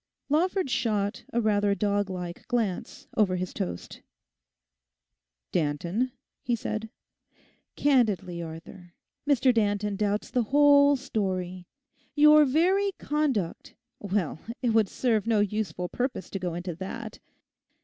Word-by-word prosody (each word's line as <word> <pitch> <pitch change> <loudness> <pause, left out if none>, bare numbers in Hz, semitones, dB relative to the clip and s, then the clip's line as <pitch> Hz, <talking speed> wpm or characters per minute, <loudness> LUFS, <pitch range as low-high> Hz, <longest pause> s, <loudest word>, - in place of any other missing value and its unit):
Lawford 360 +4 +1
shot 210 -5 -1
a 235 - +1
rather 205 -2 +2
doglike 200 -4 -2
glance 225 -7 -2
over 200 -4 +3
his 180 0 -4
toast. 90 0 -5 1.5
'Danton?' 170 - -1 0.3
he 240 - 0
said. 220 0 -4 0.9
'Candidly, 205 - +1
Arthur, 170 +2 -10 0.3
Mr 260 -2 +4
Danton 205 -2 0
doubts 205 +1 -1
the 250 - +2
whole 285 0 +6
story. 185 -8 -3 0.5
Your 300 0 +7
very 375 +8 +2
conduct—well, 210 - -2 0.2
it 240 - +2
would 220 -3 +3
serve 225 -4 0
no 225 -2 +3
useful 205 -4 -1
purpose 250 0 -3
to 195 - -3
go 180 -2 -3
into 175 0 -4
that. 220 +4 -7
210 Hz, 110 wpm, -27 LUFS, 185-255 Hz, 1.5 s, Your